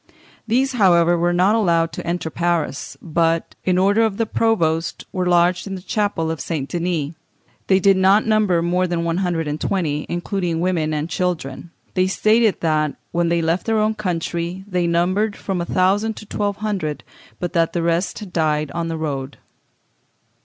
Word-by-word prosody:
These, 260 +4 +2
however, 175 -7 +4
were 175 +1 +1
not 180 +4 +3
allowed 170 -7 +2
to - - -7
enter 170 -2 -2
Paris, 170 -4 -2
but, 165 0 0
by 185 -1 +1
order 200 +4 +3
of 220 -3 +1
the 225 - +1
provost, 170 -8 0
were 180 -1 -1
lodged 175 +1 +3
in 195 - -4
the 185 - -7
Chapel 205 -7 -1
of 160 - -4
St. 150 -5 -3
Denis. 170 -1 -2 0.5
They 190 -1 +4
did 195 0 +4
not 195 +3 +4
number 210 -6 +2
more 180 +2 +1
than 170 -1 -1
one 170 0 -1
hundred 175 -4 -1
and 150 +1 -3
twenty, 155 -6 -1
including 175 -1 -2
women 170 -3 0
and 150 0 -2
children. 175 -3 -3 0.2
They 185 0 +2
stated 215 +2 +2
that, 155 -3 +1 0.2
when 170 0 +1
they 170 0 +1
left 165 +6 0
their 225 -1 +2
own 215 0 +2
country, 175 -2 -3
they 180 -3 0
numbered 185 +5 +1
from 190 -3 -3
a - - -2
thousand 205 +4 +2
to - - -10
twelve 205 0 -2
hundred, 195 -8 -3 0.4
but 175 -1 -3
that 165 -2 +1
the 170 - -1
rest 170 +2 0
had 200 -4 -9
died 155 -2 0
on 170 -1 -3
the 165 -1 -3
road..... 140 -3 -4
175 Hz, 180 wpm, -21 LUFS, 165-195 Hz, 0.5 s, however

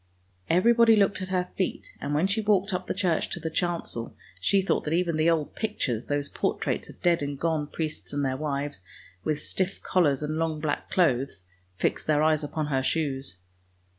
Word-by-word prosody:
Everybody 230 +5 +6
looked 200 -2 +2
at 185 - -3
her 180 -1 -1
feet, 190 - -2
and 145 +1 -1
when 155 +5 +3
she 200 +3 +1
walked 205 -1 +2
up 180 0 -2
the - - 0
church 180 -5 +1
to - - -4
the 160 - -4
chancel, 170 -9 -2 0.2
she 195 -1 +3
thought - - +1
that 155 +2 +1
even 170 -2 +1
the 155 +2 +3
old 160 -3 +1
pictures, 130 - -2
those 145 0 0
portraits - - -2
of - - -13
dead 170 -2 +3
and 140 -1 -3
gone 160 -3 0
priests 155 0 -4
and 145 -1 0
their 130 -1 0
wives, 145 -4 -3 0.4
with 155 -1 0
stiff 190 +1 -2
collars 150 -6 +2
and 155 +1 -2
long 160 -2 0
black 150 -1 -2
clothes, 130 - +1 0.3
fixed - - -1
their 150 -1 +3
eyes 155 -1 +3
upon 155 +1 -2
her 135 -3 0
shoes. 135 - -1
160 Hz, 195 wpm, -27 LUFS, 145-185 Hz, 0.4 s, Everybody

